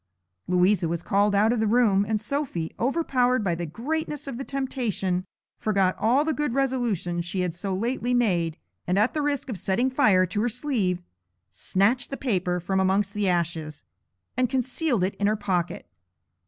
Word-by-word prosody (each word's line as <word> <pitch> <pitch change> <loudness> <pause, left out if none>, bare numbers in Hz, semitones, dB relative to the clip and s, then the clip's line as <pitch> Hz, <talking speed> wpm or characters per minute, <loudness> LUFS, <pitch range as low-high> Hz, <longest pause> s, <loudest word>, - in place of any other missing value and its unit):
Louisa 180 0 +3
was 170 +1 -3
called 205 +1 +2
out 215 +3 +4
of 240 - -1
the 220 - +1
room, 210 -3 +4
and 215 -1 +1
Sophy, 215 - -3
overpowered 255 -3 +1
by 180 -4 +1
the 170 0 -3
greatness 295 - -3
of 265 -3 -5
the - - -3
temptation, 230 -10 -2 0.3
forgot 195 -3 +1
all 250 +7 +3
the 315 - +1
good 295 -5 -1
resolutions 235 -11 0
she 180 +2 -3
had 180 -2 -1
so 190 +2 -3
lately 240 +4 -1
made, 175 -10 +1 0.3
and 180 +2 +1
at 215 +4 +3
the 310 - -1
risk 290 -2 -1
of 225 -8 -5
setting 240 +9 +1
fire 205 -9 +4
to 205 +3 -2
her 240 - +1
sleeve, 215 -8 -1 0.5
snatched 200 - +1
the 275 - -4
paper 185 -8 0
from 190 +2 -1
amongst 190 +1 +1
the 205 -2 0
ashes, 165 -3 -2 0.5
and 255 -1 +1
concealed 260 - 0
it 190 - 0
in 200 - +2
her 215 - +2
pocket. 180 -5 -2
210 Hz, 180 wpm, -25 LUFS, 180-255 Hz, 0.5 s, out